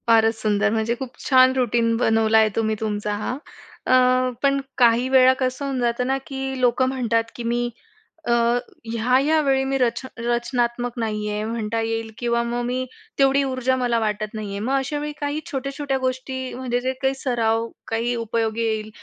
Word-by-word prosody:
फारच 225 0 +4
सुंदर! 210 -1 +2
म्हणजे 225 +2 0
खूप 255 -2 -7
छान 260 -1 +6
रूटीन 235 -2 +2
बनवला 225 -1 +3
आहे 220 -1 +5
तुम्ही 220 -1 +1
तुमचा 210 -1 -2
हा. 255 - -2 0.5
अ, - - +2 0.5
पण 275 0 +3 0.2
काही 240 0 +4
वेळा 260 -1 +6
कसं 255 +2 -1
होऊन 270 -2 -2
जातं 240 +1 0
ना 270 +1 +1
की 265 -1 -4
लोकं 250 +1 +3
म्हणतात, 235 -3 +1
की 240 - -6
मी 240 +1 0 0.6
अ, - - +2 0.6
ह्या-ह्या 255 +7 +3
वेळी 270 -2 +2
मी 270 0 0
रच 235 -3 +1 0.2
रचनात्मक 240 0 -1
नाही 210 -2 -2
आहे 210 0 -2
म्हणता 225 0 -2
येईल 225 0 -2
किंवा 235 -1 0
मग 240 +1 -2
मी 255 +1 -1 0.3
तेवढी 275 0 +4
ऊर्जा 260 -1 0
मला 245 -2 +1
वाटत 215 -1 -2
नाही 215 -2 -5
आहे. 200 0 -4
मग 265 - 0
अशा 275 +2 -2
वेळी 300 0 -3
काही 290 +1 -1
छोट्या-छोट्या 275 0 -2
गोष्टी 260 0 -3
म्हणजे 245 -1 -2
जे 260 +1 -1
काही 265 0 +2
सराव, 230 -3 0 0.2
काही 230 +2 -1
उपयोगी 230 -1 -1
येईल 220 -1 -1
240 Hz, 175 wpm, -22 LUFS, 225-260 Hz, 0.6 s, छान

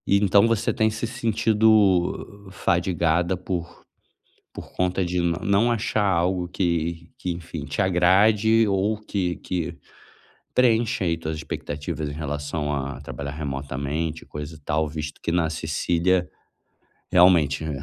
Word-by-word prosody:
Então 100 +1 +4
você 115 -2 +1
tem 110 0 +2
se 110 +2 -3
sentido 105 -4 +2
fadigada 85 -1 +1
por 90 -1 -5 0.7
por - - -9
conta 90 0 0
de 90 0 -1
não 85 0 0
não 100 +4 +3
achar 110 -2 0
algo 90 -1 +1
que 85 -2 -2
que, 90 - -3
enfim, 85 -3 -6
te 75 +6 -2
agrade 100 +5 +4
ou 100 +2 +1
que 95 -4 -2
que 85 -2 -4 0.8
preenche 115 -5 +2
aí 85 -2 +1
tuas 80 -1 -4
expectativas 75 0 -5
em - - -5
relação 75 0 -3
a 70 0 -4
trabalhar 70 0 -6
remotamente 70 +2 -4
e - - -27
coisa 75 +2 -7
e - - -16
tal, 75 +1 -1
visto 75 -1 -6
que - - -1
na 85 -1 +1
Sicília, 85 +3 0 0.8
realmente, 85 -5 +4
né, 70 -4 -4
85 Hz, 140 wpm, -24 LUFS, 80-100 Hz, 0.8 s, Então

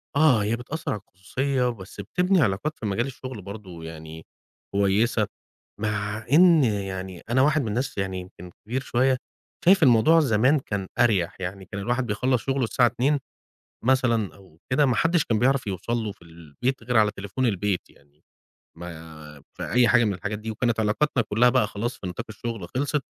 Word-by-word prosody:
آه 140 -8 +5
هي 110 +3 0
بتأثر 145 +7 -5
على 105 - -3
الخصوصية 125 +7 -1
بس 100 -3 -8
بتبني 180 - +2
علاقات 115 +7 0
في - - -5
مجال 105 +5 0
الشغل 130 -4 -7
برضه 95 -4 -9
يعني 80 0 -9 0.5
كويسة، 100 +2 +2 0.5
مع 105 0 -2
إن 170 -1 +7
يعني 95 -5 -3
أنا 130 +2 +3
واحد 150 +2 +3
من 115 - -3
الناس 120 +4 -2
يعني 95 -1 -2
يمكن 90 -1 -11
كبير 125 +4 -2
شوية 130 0 +2 0.5
شايف 185 -2 +6
الموضوع 125 +6 +6
زمان 130 +1 +3
كان 100 -6 -4
أريح، 100 -6 +2
يعني 95 +1 -5
كان 100 +2 -6
الواحد 120 +4 0
بيخلّص 125 +3 +1
شغله 135 -1 0
الساعة 120 +2 +3
14:00 130 +5 +1 0.7
مثلًا 120 -5 +2
أو 95 -5 -19
كده 140 +2 +4
ما 125 - +2
حدّش 165 -1 +2
كان 110 - 0
بيعرف 130 +1 +2
يوصل 100 +4 -4
له 110 -3 -3
في 110 - -23
البيت 85 - -4
غير 120 +1 -1
على 105 -1 +5
تليفون 100 +5 -3
البيت 100 -3 -1
يعني، 70 +1 -26 0.6
ما 80 -3 -10 0.2
في - - -5
أي 125 -1 +5
حاجة 120 +1 +5
من 105 - 0
الحاجات 100 +3 -4
دي 110 +1 -5
وكانت 120 +1 0
علاقاتنا 115 +4 +1
كلها 120 +4 +3
بقى 125 -5 +2
خلاص 115 +4 -4
في 95 - -6
نطاق 90 - -5
الشغل 110 -3 -5
خلصت 145 +2 0
110 Hz, 180 wpm, -25 LUFS, 95-130 Hz, 0.7 s, إن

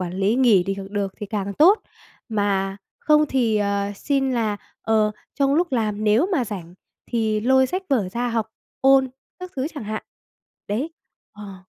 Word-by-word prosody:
quản 180 -1 -3
lý 195 +3 +1
nghỉ 230 -8 +5
đi 195 +1 -3
được 200 -2 -2
thì 210 - -4
càng 200 -1 -3
tốt. 370 - +6 0.5
Mà 200 -3 0 0.2
không 300 0 +4
thì, 235 -5 +1
ờ, 200 0 0
xin 270 +2 0
là, 220 -4 0 0.3
ờ, 215 -1 +2 0.2
trong 275 -1 +2
lúc 345 0 +1
làm 215 -3 -1
nếu 220 +9 +4
mà 280 -9 +2
rảnh 180 -5 -7 0.3
thì 220 -2 0
lôi 260 +3 +4
sách 370 +8 -3
vở 225 -9 +2
ra 240 +5 -2
học, 230 -2 -1 0.3
ôn 270 0 +5 0.3
các 365 0 -7
thứ 260 - -1
chẳng 285 - -6
hạn. 215 +1 -4 0.7
Đấy. 250 +10 -2 0.4
Ờ. 205 -2 -9
220 Hz, 175 wpm, -23 LUFS, 205-265 Hz, 0.7 s, tốt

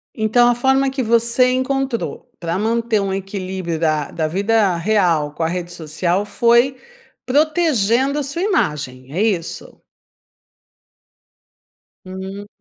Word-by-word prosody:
Então 235 +2 +3
a 240 - +3
forma 265 +2 +2
que 265 0 -2
você 235 +2 +3
encontrou 260 -1 -2
pra 170 +1 -2
manter 225 +1 0
um 195 -1 -2
equilíbrio 190 -3 -4
da 155 -2 0
da 160 -2 -2
vida 200 +1 +1
real 170 -5 +1
com 165 - -6
a 160 - +1
rede 175 0 -4
social 170 +5 -1
foi 235 +5 +3 0.5
protegendo 280 - +2
a - - 0
sua 285 +6 -4
imagem, 140 - -1
é 185 - 0
isso? 190 -7 -2 2.3
Hum. 190 +2 -7
210 Hz, 125 wpm, -19 LUFS, 175-250 Hz, 2.3 s, Então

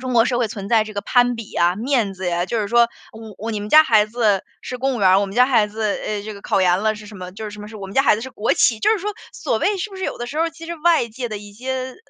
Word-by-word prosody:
中 255 0 -4
国 230 -1 +5
社 245 -1 0
会 235 -3 +1
存 200 -3 -7
在 225 -1 +4
这 215 - -10
个 200 - -2
攀 245 0 +3
比 225 -2 -8
呀、 175 +1 +1
面 230 -3 0
子 190 0 -5
啊， 175 +1 0
就 230 - -2
是 205 - -2
说： 235 +1 +5 0.3
“哦， 220 -2 -11
哦， 225 +2 -4
你 210 -2 -3
们 210 - -6
家 310 +6 +8
孩 215 -5 +4
子， 215 -3 +1 0.2
是 250 - -6
公 265 +1 0
务 - - -5
员 195 - +4
儿， 190 +1 +5
我 200 - 0
们 195 - -9
家 250 - +7
孩 230 -6 +3
子， 215 +2 -6
呃， 210 0 -2
这 215 - -6
个 200 - -11
考 190 - +1
研 180 0 +3
了 215 0 +1
是 210 0 -11
什 205 0 -11
么 180 0 -7
就 210 +3 -8
是 210 - -5
什 210 0 -10
么 210 - -9
是 220 - -10
我 200 - -8
们 195 - -10
家 270 - +4
孩 240 - +4
子 225 - -6
是 260 - -7
国 225 -2 0
企。 225 - +3
“就 - - +2
是 440 - +2
说 415 +3 -3 0.2
所 - - -1
谓 410 - +1
是 415 +4 -4
不 390 - -10
是 375 - -4
有 - - -3
的 240 - -4
时 295 +5 -5
候 325 - +3
儿 335 - -2
其 330 0 -12
实 340 - -4
外 325 -5 +3
界 240 +2 -5
的 215 - -5
一 205 0 -12
些 250 +6 -6 0.2
呃， - - -15
220 Hz, 380 characters per minute, -21 LUFS, 205-255 Hz, 0.3 s, 家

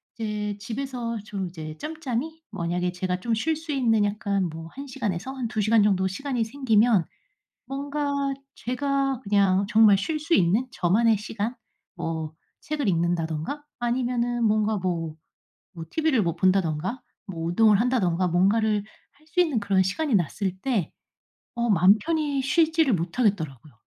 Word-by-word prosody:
이제 210 -2 -3
집에서 240 +1 -4
좀 195 -3 -4
이제 155 -3 -8
짬짬이 315 0 -4
만약에 175 +1 -1
제가 180 0 -2
좀 235 - -1
쉴 310 +9 +1
수 315 0 -6
있는 230 -6 +2
약간 200 -3 -1
뭐 160 +1 -8
1 275 +2 -7
시간에서 230 -4 -3
한 260 -3 -3
2 220 -1 -2
시간 215 +2 +4
정도 190 -2 +2
시간이 245 +5 -2
생기면 225 - +3 0.6
뭔가 280 0 -2 0.2
제가 275 +1 -1
그냥 200 -1 +3
정말 215 -2 +6
쉴 305 +9 -2
수 320 +3 -1
있는 205 - +3
저만의 220 +1 +3
시간 215 +3 -4 0.4
뭐 160 -2 -4 0.3
책을 295 -5 -2
읽는다든가 170 - -1 0.2
아니면은 240 0 0
뭔가 215 0 +2
뭐 170 -4 -2 0.6
뭐 165 - -6
TV를 310 -8 +2
뭐 170 -2 -1
본다든가 185 - +1 0.4
뭐 - - -2
운동을 210 +3 +4
한다든가 190 -8 +1
뭔가를 205 +4 +2 0.3
할 305 - -27
수 360 +3 0
있는 315 -9 +2
그런 200 -2 +2
시간이 240 - -1
났을 185 +1 0
때 225 - -1 0.6
어 235 -1 0
맘 190 +2 +6
편히 305 -4 0
쉬지를 320 +1 +3
못하겠더라고요. 165 - -1
215 Hz, 295 characters per minute, -25 LUFS, 185-265 Hz, 0.6 s, 정말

